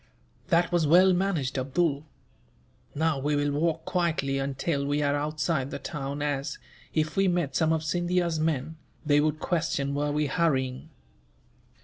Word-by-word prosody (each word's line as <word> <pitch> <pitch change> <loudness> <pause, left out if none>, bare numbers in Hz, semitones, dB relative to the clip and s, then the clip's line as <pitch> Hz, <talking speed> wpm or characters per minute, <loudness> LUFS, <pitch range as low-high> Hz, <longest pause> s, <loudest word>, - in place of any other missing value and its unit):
"That 170 -1 +2
was 170 -3 +2
well 185 +4 +6
managed, 170 -8 0
Abdool. 145 +2 0 0.9
Now 155 -1 +1
we 145 +2 0
will 145 0 +1
walk 160 +2 0
quietly 160 -6 0
until 140 +2 -1
we 145 +1 0
are 145 0 +1
outside 150 -1 -1
the - - -4
town 145 -1 -5
as, 145 0 -2 0.3
if 155 -1 -1
we 195 0 +3
met 175 -6 0
some 160 -1 +2
of 160 -1 0
Scindia's 175 0 0
men, 155 0 -1 0.3
they 145 -1 +4
would 155 +1 +1
question 155 -5 -1
were 145 +1 0
we 150 +1 0
hurrying." 130 -5 0
150 Hz, 150 wpm, -27 LUFS, 140-170 Hz, 0.9 s, well